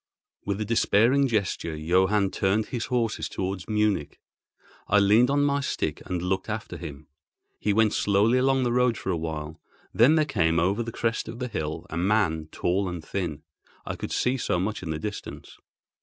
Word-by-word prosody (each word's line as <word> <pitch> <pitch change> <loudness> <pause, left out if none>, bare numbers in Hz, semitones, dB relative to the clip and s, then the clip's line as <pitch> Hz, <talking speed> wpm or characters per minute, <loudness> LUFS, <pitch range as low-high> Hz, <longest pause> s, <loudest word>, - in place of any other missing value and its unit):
With 100 0 -2
a 110 - -1
despairing 115 +5 +3
gesture, 100 -8 -1
Johann 95 +5 +2
turned 100 +3 0
his 120 -3 -3
horses 120 -4 -1
towards 95 -2 -4
Munich. 105 -7 0 0.7
I 105 - +4
leaned 105 +5 +5
on 145 +1 +2
my 140 0 +2
stick 140 - -2
and 90 -1 -2
looked 95 +3 -1
after 110 0 -4
him. 70 +1 -8 0.5
He 105 - 0
went 110 +1 +3
slowly 105 +5 +3
along 135 0 +2
the 120 -1 0
road 125 -2 +2
for 95 - -3
a - - 0
while: 80 -1 -5 0.3
then 125 +8 +5
there 155 -1 +3
came 85 - +1
over 95 +7 +1
the 115 0 -4
crest 115 0 -2
of 115 +1 -7
the 125 0 -3
hill 80 -7 -4
a 80 - -3
man 90 -4 +1
tall 95 +2 0
and 85 -3 -6
thin. 80 -6 -4 0.4
I - - -4
could - - -6
see 125 +2 +1
so 90 - 0
much 105 +4 -2
in 90 - -6
the 80 - -2
distance. 105 +6 -7
105 Hz, 185 wpm, -26 LUFS, 90-115 Hz, 0.7 s, leaned